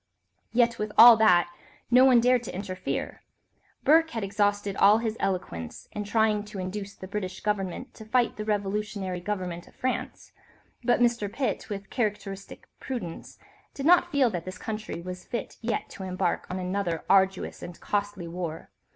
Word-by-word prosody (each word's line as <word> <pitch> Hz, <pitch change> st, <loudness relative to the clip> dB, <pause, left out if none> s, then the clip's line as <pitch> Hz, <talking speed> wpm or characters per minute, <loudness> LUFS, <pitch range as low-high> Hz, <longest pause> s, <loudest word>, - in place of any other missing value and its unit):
Yet, 235 Hz, -1 st, +2 dB
with 210 Hz, 0 st, -2 dB
all 235 Hz, 0 st, +11 dB
that, 175 Hz, -6 st, +4 dB, 0.4 s
no 250 Hz, +1 st, +7 dB
one 255 Hz, -2 st, +6 dB
dared 250 Hz, +1 st, +3 dB
to -, -, -6 dB
interfere. 185 Hz, -1 st, -4 dB, 0.6 s
Burke 320 Hz, +2 st, +5 dB
had 225 Hz, -6 st, -4 dB
exhausted 205 Hz, 0 st, 0 dB
all 205 Hz, +2 st, +6 dB
his 225 Hz, -1 st, -2 dB
eloquence 85 Hz, -, -3 dB
in 210 Hz, -1 st, -4 dB
trying 215 Hz, 0 st, +2 dB
to 210 Hz, -1 st, -9 dB
induce 195 Hz, +2 st, -5 dB
the 190 Hz, -, -9 dB
British 190 Hz, -2 st, -5 dB
Government 210 Hz, +4 st, -2 dB
to 220 Hz, -, -11 dB
fight 240 Hz, +2 st, +1 dB
the 215 Hz, -, -4 dB
revolutionary 205 Hz, -2 st, -2 dB
government 180 Hz, -3 st, -4 dB
of -, -, -19 dB
France, 255 Hz, 0 st, -3 dB, 0.5 s
but 240 Hz, +1 st, +3 dB
Mr. 235 Hz, -4 st, +2 dB
Pitt, 270 Hz, -1 st, -2 dB
with 200 Hz, -1 st, -6 dB
characteristic 205 Hz, -4 st, -4 dB
prudence, 235 Hz, -11 st, -6 dB, 0.4 s
did 275 Hz, -, -4 dB
not 350 Hz, +1 st, +5 dB
feel 275 Hz, -5 st, +3 dB
that 175 Hz, -4 st, -4 dB
this 185 Hz, +3 st, -7 dB
country 215 Hz, -6 st, -5 dB
was 180 Hz, 0 st, -7 dB
fit 235 Hz, -4 st, -5 dB
yet 230 Hz, 0 st, -2 dB
to -, -, -10 dB
embark 185 Hz, -1 st, -1 dB
on 185 Hz, -, -3 dB
another 180 Hz, -2 st, -2 dB
arduous 190 Hz, -1 st, +2 dB
and 175 Hz, -1 st, -9 dB
costly 205 Hz, -4 st, -2 dB
war. 165 Hz, -2 st, -6 dB
205 Hz, 165 wpm, -27 LUFS, 185-230 Hz, 0.6 s, all